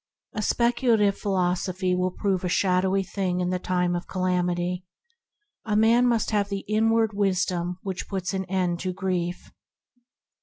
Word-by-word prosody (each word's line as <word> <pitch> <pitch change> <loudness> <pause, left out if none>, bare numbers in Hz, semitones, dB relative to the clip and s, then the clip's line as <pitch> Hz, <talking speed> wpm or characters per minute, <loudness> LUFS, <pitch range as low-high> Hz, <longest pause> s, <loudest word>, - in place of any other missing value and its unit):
A 215 - -2
spec 235 +3 +1
ulative 220 -6 +3
philosophy 185 -1 0
will 180 0 +1
prove 190 0 -1
a 180 - -1
shadowy 190 +1 +2
thing 185 -1 -2
in 180 0 0
the 185 - -1
time 180 -1 0
of 175 - -4
calamity; 180 -1 -1 0.8
a 210 -2 -1
man 230 +3 +4
must 230 -3 +1
have 205 -1 +1
the 200 -1 -4
inward 220 +1 +2
Wisdom 180 -3 0
that 190 -1 -4
puts 185 -2 -3
an 190 0 -2
end 180 -2 -1
to 185 0 -3
grief. 180 -2 -3
185 Hz, 155 wpm, -25 LUFS, 180-205 Hz, 0.8 s, man